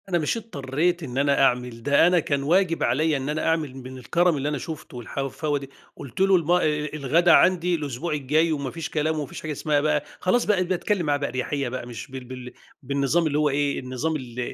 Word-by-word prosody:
أنا 175 Hz, -, +2 dB
مش 155 Hz, +8 st, 0 dB
اضطريت 175 Hz, -4 st, -2 dB
إن 130 Hz, -3 st, -6 dB
أنا 140 Hz, 0 st, +2 dB
أعمل 125 Hz, -2 st, 0 dB
ده، 145 Hz, +5 st, +5 dB
أنا 180 Hz, 0 st, +4 dB
كان 140 Hz, -3 st, -1 dB
واجب 170 Hz, +2 st, +2 dB
عليّا 150 Hz, +5 st, +2 dB
إن 135 Hz, +1 st, -4 dB
أنا 155 Hz, +1 st, -2 dB
أعمل 160 Hz, -5 st, 0 dB
من 130 Hz, 0 st, -9 dB
الكَرم 170 Hz, +6 st, +1 dB
اللي 140 Hz, +2 st, -1 dB
أنا 150 Hz, -, -2 dB
شُفته 135 Hz, -4 st, -7 dB
والحفاوة 145 Hz, +2 st, -2 dB
دي. 135 Hz, -1 st, -10 dB, 0.3 s
قُلت 135 Hz, +6 st, -7 dB
له: 195 Hz, 0 st, +5 dB
"الم 170 Hz, -2 st, +1 dB
أ -, -, +6 dB
أ 150 Hz, 0 st, 0 dB
الغدا 155 Hz, +4 st, +3 dB
عندي 180 Hz, -1 st, +4 dB
الأسبوع 150 Hz, +1 st, -3 dB
الجاي 150 Hz, +3 st, +1 dB
وما 140 Hz, -4 st, -2 dB
فيش 165 Hz, +1 st, -5 dB
كلام، 155 Hz, +1 st, 0 dB
وما 150 Hz, -, -2 dB
فيش -, -, -9 dB
حاجة 155 Hz, -, -4 dB
اسمها 150 Hz, 0 st, 0 dB
بقى" 150 Hz, -1 st, +1 dB, 0.2 s
خلاص، 235 Hz, +6 st, +2 dB
بقيت 185 Hz, -4 st, +2 dB
باتكلم 185 Hz, 0 st, 0 dB
معاه 145 Hz, -1 st, +2 dB
بقى 140 Hz, 0 st, -2 dB
باريحيّة 130 Hz, +1 st, -2 dB
بقى 125 Hz, -1 st, -5 dB
مش 120 Hz, +3 st, -8 dB
بال 130 Hz, -1 st, -7 dB
بال 125 Hz, 0 st, -9 dB, 0.3 s
بالنظام 140 Hz, +5 st, +1 dB
اللي 145 Hz, -1 st, 0 dB
هو 150 Hz, -1 st, +3 dB
إيه، 140 Hz, 0 st, 0 dB
النظام 130 Hz, +5 st, -3 dB
ال 125 Hz, -4 st, -7 dB
150 Hz, 225 wpm, -24 LUFS, 135-165 Hz, 0.3 s, أ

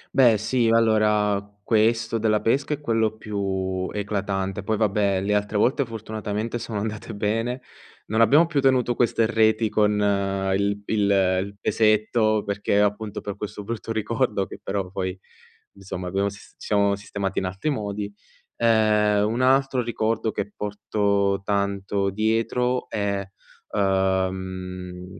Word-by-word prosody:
Beh, 120 Hz, -5 st, +6 dB
sì, 115 Hz, +3 st, +1 dB
allora, 105 Hz, -3 st, +3 dB, 0.2 s
questo 115 Hz, +1 st, +2 dB
della 110 Hz, -1 st, +1 dB
pesca 140 Hz, +6 st, +1 dB
è 150 Hz, -, -5 dB
quello 110 Hz, -4 st, +1 dB
più 95 Hz, -3 st, -2 dB
eclatante, 100 Hz, -2 st, -2 dB
poi, 110 Hz, +3 st, -1 dB
vabbè, 100 Hz, -2 st, +1 dB
le 105 Hz, +1 st, 0 dB
altre 105 Hz, +1 st, -1 dB
volte 130 Hz, +6 st, +2 dB
fortunatamente 110 Hz, 0 st, -4 dB
sono 110 Hz, -2 st, -4 dB
andate 110 Hz, 0 st, -5 dB
bene. 115 Hz, +5 st, -1 dB, 0.5 s
Non 110 Hz, +2 st, 0 dB
abbiamo 145 Hz, +8 st, +6 dB
più 160 Hz, -4 st, -1 dB
tenuto 130 Hz, -2 st, +3 dB
queste 115 Hz, -1 st, +2 dB
reti 110 Hz, -1 st, +2 dB
con 105 Hz, 0 st, +2 dB, 0.6 s
il 100 Hz, +1 st, 0 dB
il 105 Hz, -2 st, +1 dB
il 95 Hz, 0 st, +1 dB
pesetto, 110 Hz, 0 st, +2 dB
perché 100 Hz, 0 st, 0 dB
appunto 105 Hz, +1 st, -1 dB
per 100 Hz, -1 st, -6 dB
questo 105 Hz, 0 st, -6 dB
brutto 115 Hz, +1 st, -4 dB
ricordo 110 Hz, -2 st, 0 dB
che -, -, -10 dB
però 95 Hz, -2 st, -3 dB
poi 95 Hz, -1 st, -3 dB, 0.6 s
insomma 95 Hz, -2 st, -6 dB
abbiamo 100 Hz, +2 st, 0 dB
sis 100 Hz, 0 st, -10 dB
ci -, -, -10 dB
siamo 100 Hz, -1 st, +2 dB
sistemati 100 Hz, -1 st, -3 dB
in 95 Hz, -, -3 dB
altri 95 Hz, +11 st, -3 dB
modi. 105 Hz, -5 st, -3 dB, 0.4 s
Ehm, 105 Hz, -2 st, +3 dB
un 115 Hz, -, -2 dB
altro 135 Hz, 0 st, +3 dB
ricordo 115 Hz, -1 st, -1 dB
che 105 Hz, 0 st, -4 dB
porto 100 Hz, -1 st, 0 dB
tanto 100 Hz, -1 st, 0 dB
dietro 115 Hz, +4 st, 0 dB
è 100 Hz, -1 st, -1 dB, 0.5 s
ehm, 95 Hz, -1 st, -2 dB
105 Hz, 140 wpm, -24 LUFS, 100-115 Hz, 0.6 s, Beh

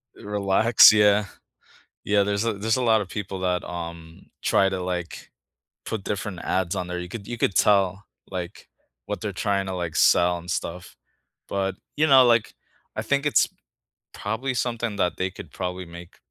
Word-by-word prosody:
Relax, 105 Hz, +3 st, +5 dB
yeah. 105 Hz, -1 st, +4 dB, 0.8 s
Yeah, 100 Hz, 0 st, +3 dB
there's 100 Hz, +2 st, -1 dB
a 115 Hz, -, +1 dB
there's 110 Hz, +4 st, 0 dB
a 130 Hz, -, -1 dB
lot 110 Hz, -2 st, +4 dB
of 95 Hz, -, -7 dB
people 100 Hz, -2 st, -5 dB
that, 90 Hz, -1 st, 0 dB
um, 85 Hz, -1 st, -8 dB, 0.2 s
try 95 Hz, -, +3 dB
to, 95 Hz, -1 st, -3 dB
like, 90 Hz, -2 st, -5 dB, 0.5 s
put 105 Hz, -3 st, -4 dB
different 100 Hz, -3 st, -4 dB
ads 95 Hz, 0 st, 0 dB
on 90 Hz, -, -3 dB
there. 90 Hz, 0 st, -4 dB
You 90 Hz, -, -6 dB
could 100 Hz, +1 st, -8 dB
you 120 Hz, -, -6 dB
could 100 Hz, -, +1 dB
tell, 100 Hz, -1 st, +3 dB, 0.3 s
like, 90 Hz, 0 st, -7 dB, 0.4 s
what -, -, -4 dB
they're -, -, -4 dB
trying 100 Hz, -1 st, -1 dB
to, 95 Hz, -, -4 dB
like, 85 Hz, -3 st, -4 dB
sell 90 Hz, 0 st, +4 dB
and 85 Hz, +1 st, -8 dB
stuff. 85 Hz, +1 st, -5 dB, 0.5 s
But, 95 Hz, -1 st, -2 dB, 0.2 s
you 155 Hz, +1 st, +3 dB
know, 135 Hz, -3 st, +7 dB
like, 120 Hz, -2 st, +2 dB, 0.4 s
I -, -, -2 dB
think 140 Hz, 0 st, 0 dB
it's 150 Hz, -, +3 dB, 0.7 s
probably 120 Hz, +6 st, -3 dB
something 120 Hz, -3 st, -2 dB
that 90 Hz, -4 st, 0 dB
they 95 Hz, 0 st, -1 dB
could 95 Hz, -, -11 dB
probably 90 Hz, 0 st, -4 dB
make 85 Hz, +1 st, -12 dB
100 Hz, 175 wpm, -24 LUFS, 90-110 Hz, 0.8 s, know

